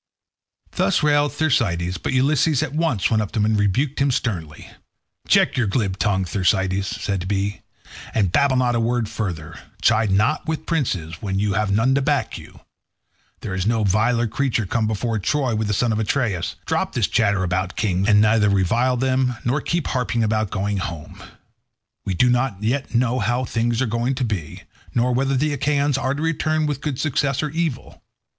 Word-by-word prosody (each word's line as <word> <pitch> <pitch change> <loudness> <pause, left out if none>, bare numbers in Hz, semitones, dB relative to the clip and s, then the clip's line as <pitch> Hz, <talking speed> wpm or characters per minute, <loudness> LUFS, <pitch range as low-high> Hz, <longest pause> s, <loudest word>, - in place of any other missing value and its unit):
Thus - - +1
railed 145 -1 +3
Thersites, 90 - 0
but - - -3
Ulysses 140 +2 +2
at 135 - -5
once 150 - 0
went 110 -1 +3
up 105 - -4
to - - -1
him 105 - +2
and 110 -1 +1
rebuked 125 +8 0
him 140 - +3
sternly. 85 - -3 0.6
"Check - - +4
your 120 -4 +1
glib 95 -3 -1
tongue, 95 -2 +1
Thersites," 95 +1 0
said 95 -3 -2
he, 100 0 -2 0.5
"and 100 -6 +1
babble 140 +4 +3
not 125 -1 +2
a 120 - +1
word 115 0 0
further. 95 -8 -5 0.2
Chide 110 -1 +3
not 105 +13 +1
with 160 -1 -3
princes 90 - -2
when 95 -2 -2
you 100 0 0
have 105 -2 0
none 115 +6 +3
to 140 - +2
back - - 0
you. - - -12 0.8
There 95 - -5
is 95 +2 -1
no 115 -1 +1
viler 110 +4 +2
creature 120 -1 -1
come 110 +3 0
before 110 +1 -1
Troy 130 +4 0
with 110 0 -1
the 105 - 0
sons 120 +2 +1
of 105 - -1
Atreus. 110 -5 -1
Drop - - -1
this - - +1
chatter 100 -2 +1
about 95 +1 -2
kings, 95 -1 0
and 105 -1 +6
neither 105 -1 +4
revile 115 +7 +2
them 130 0 +1
nor 130 +5 +1
keep 170 +2 -1
harping 125 -3 -1
about 110 -1 0
going 100 +1 -2
home. 85 -5 -6 0.9
We 95 - -1
do 125 - +3
not 120 -5 0
yet 125 +2 -1
know 125 +1 +2
how 120 +4 0
things 120 +1 0
are - - +1
going 120 +3 -1
to 130 - -2
be, 95 -9 -5 0.3
nor 125 +1 +2
whether 135 +2 +1
the 150 +2 0
Achaeans 145 0 +1
are 135 0 -1
to 150 - -4
return 155 -1 0
with 145 -2 -2
good 140 -4 -3
success 140 -2 0
or 150 - -2
evil. 160 -5 -3
115 Hz, 190 wpm, -22 LUFS, 100-130 Hz, 0.9 s, and